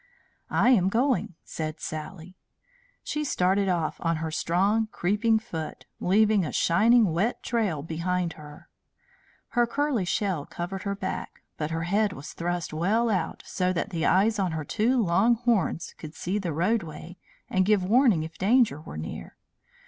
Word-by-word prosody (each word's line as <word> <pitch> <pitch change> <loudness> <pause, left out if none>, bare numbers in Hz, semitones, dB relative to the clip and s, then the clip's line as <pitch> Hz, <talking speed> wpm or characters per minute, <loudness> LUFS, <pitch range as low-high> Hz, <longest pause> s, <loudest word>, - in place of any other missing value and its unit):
"I 250 - +3
am 190 -7 +4
going," 240 - +1
said 155 -1 -5
Sally. 160 +3 -7 0.7
She 300 - -2
started 195 -6 +1
off 170 -4 -1
on 165 0 +1
her 160 0 -3
strong, 195 +7 +1
creeping 215 +3 +1
foot, 170 -8 -6
leaving 210 +1 +3
a 155 - -3
shining 220 +3 +4
wet 200 +9 0
trail 205 -12 -1
behind 170 +2 -2
her. 150 -1 -13 0.8
Her 240 -1 +2
curly 275 -5 0
shell 175 -5 -1
covered 190 +3 -5
her 200 - -1
back, 200 - -5
but 150 -1 -3
her 165 0 -2
head 200 +3 +1
was 140 +2 -9
thrust 175 -1 -3
well 215 +9 +1
out, 185 -5 -2
so 185 -1 0
that 185 +4 -2
the 165 -3 0
eyes 205 +4 +3
on 185 -4 0
her 155 -2 -3
two 240 - +1
long 210 +4 +3
horns 230 -8 0
could 155 0 -9
see 190 +4 -2
the 180 -4 -3
roadway 175 0 -2 0.3
and 190 - +2
give 205 -1 +3
warning 220 - +4
if 160 0 -9
danger 210 - +3
were 75 - -9
near. 80 +1 -7
185 Hz, 160 wpm, -26 LUFS, 165-220 Hz, 0.8 s, am